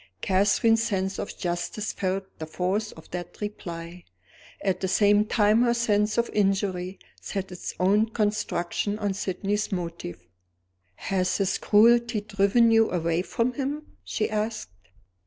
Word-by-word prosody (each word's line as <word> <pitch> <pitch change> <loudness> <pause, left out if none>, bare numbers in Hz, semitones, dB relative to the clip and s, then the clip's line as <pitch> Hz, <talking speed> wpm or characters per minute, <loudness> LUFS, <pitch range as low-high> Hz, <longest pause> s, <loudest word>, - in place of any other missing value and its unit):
Catherine's 205 +4 +3
sense 195 -4 -1
of - - -5
justice 175 +4 -3
felt 190 0 -1 0.2
the 155 - -5
force 190 +6 -1
of 160 - -15
that 175 0 -6
reply. 175 -4 -6 0.6
At 190 -2 0
the 190 - -1
same 205 +2 +4
time 215 +1 +3
her 240 -1 +3
sense 210 -2 +1
of 235 0 +2
injury 195 -2 0 0.2
set 195 -2 -4
its 180 - -6
own 205 +4 +3
construction 210 -2 -1
on 205 -2 -1
Sydney's 200 +2 -2
motive. 170 - -5 0.7
"Has 185 -2 -1
his 195 -2 0
cruelty 235 +1 +4
driven 205 +3 +3
you 225 0 +5
away 170 -1 0
from 230 +6 -1
him?" 290 +3 -4
she 215 - -1
asked. 215 - -3
205 Hz, 140 wpm, -26 LUFS, 185-215 Hz, 0.7 s, you